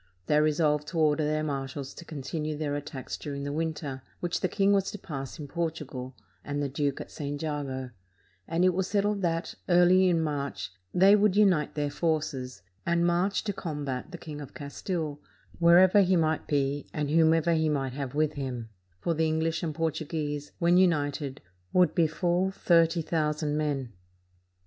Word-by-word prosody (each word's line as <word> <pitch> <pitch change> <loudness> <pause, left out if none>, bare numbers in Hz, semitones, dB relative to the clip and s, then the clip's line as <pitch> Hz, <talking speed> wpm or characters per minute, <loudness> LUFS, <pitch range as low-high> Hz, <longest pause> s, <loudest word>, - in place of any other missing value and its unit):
They 150 0 +3
resolved 150 -1 +2
to 170 - -5
order 155 -1 +3
their 155 +1 0
marshals 140 -1 -4
to 170 - -11
continue 155 +1 -4
their 145 -2 -2
attacks 145 -2 -5
during 140 -2 -5
the 145 0 -3
win 160 +1 -1
ter, 135 -4 -6 0.2
which 175 -1 -1
the - - +1
king 200 +2 +2
was 195 -1 +2
to - - -6
pass 135 -8 -6
in 150 - -7
Portugal, 150 -6 -4 0.3
and 145 0 -3
the 145 - 0
duke 140 0 -1
at - - -8
St. 145 -1 -4
Jago; 140 -4 -3 0.6
and 170 +3 +2
it 185 - +4
was 190 +1 0
settled 205 0 +1
that, 165 -1 -1 0.2
early 180 +1 +6
in 170 -2 +2
March, 140 -8 -3 0.2
they 195 +3 +6
would 205 -2 +3
unite 190 -8 +3
their 145 -1 -1
forces, 145 - -2 0.2
and 170 0 +2
march 175 +3 +1
to 205 - -2
combat 145 -7 -4
the 175 - -7
King 150 -3 -8
of 140 - -10
Castile, 150 +1 -4 0.4
wherever 180 +4 +7
he 185 -1 +3
might 160 -2 +1
be, 140 0 0
and 150 -1 -2
whomever 165 +1 +4
he 160 -1 +2
might 135 -3 -1
have 140 -1 -5
with 155 0 +2
him; 125 -5 -5 0.3
for 170 - 0
the 160 0 +1
English 160 +1 0
and 160 -4 -3
Portuguese, 150 -2 -2
when 175 +1 +4
united, 145 -6 +1 0.3
would 180 -1 +4
be 165 -2 +3
full 175 +3 +1
thirty 165 -3 +3
thousand 150 -2 0
men. 140 -6 -2
155 Hz, 180 wpm, -28 LUFS, 145-170 Hz, 0.6 s, wherever